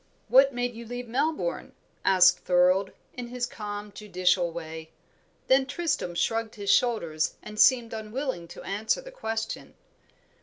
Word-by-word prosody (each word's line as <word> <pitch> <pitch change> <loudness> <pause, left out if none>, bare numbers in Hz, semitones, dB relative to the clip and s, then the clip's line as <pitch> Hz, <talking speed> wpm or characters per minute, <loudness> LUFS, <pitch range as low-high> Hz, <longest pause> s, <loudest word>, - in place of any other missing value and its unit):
"What 270 +1 +6
made 245 -1 -2
you 230 +1 -8
leave 245 +1 -6
Melbourne!" 300 - -2 0.3
asked 180 -1 +5
Thorold, 185 +2 +3 0.2
in 245 -1 -6
his 245 0 -2
calm, 210 -3 -6
judicial 185 -3 +1
way. 160 -1 -7 0.6
Then 265 0 +4
Tristram 290 - -2
shrugged 225 +4 -1
his 200 -2 0
shoulders 170 -11 +1
and 210 0 -8
seemed 245 -3 +5
unwilling 220 -3 -4
to - - -11
answer 210 - -1
the - - -11
question. 225 - -4
220 Hz, 140 wpm, -27 LUFS, 185-250 Hz, 0.6 s, What